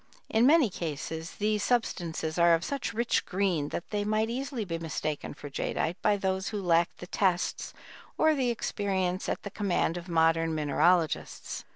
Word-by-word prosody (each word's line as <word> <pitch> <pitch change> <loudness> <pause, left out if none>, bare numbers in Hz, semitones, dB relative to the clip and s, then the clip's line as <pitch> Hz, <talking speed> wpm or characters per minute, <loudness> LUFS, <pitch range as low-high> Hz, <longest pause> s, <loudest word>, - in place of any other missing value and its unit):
In 230 +3 +4
many 295 - +5
cases 160 0 -5
these 210 0 0
substances 175 -8 -1
are 170 0 +6
of 165 +3 -3
such 280 -4 -2
rich 235 +2 +1
green 180 -6 0
that - - -5
they 205 -1 0
might 215 +2 0
easily 260 -2 -3
be 165 -2 -3
mistaken 155 -3 -4
for 145 - -9
jadeite 160 +4 -2
by 210 -1 +3
those 190 -1 -1
who 210 - -3
lacked 170 -2 +2
the - - -8
tests 180 -1 0 0.5
or 315 - +4
the 260 -4 +1
experience 190 -5 -1
at - - -3
the 200 - -6
command 190 -4 0
of 175 +1 -8
modern 165 -1 +2
mineralogists. 160 +2 +1
185 Hz, 170 wpm, -29 LUFS, 165-215 Hz, 0.5 s, are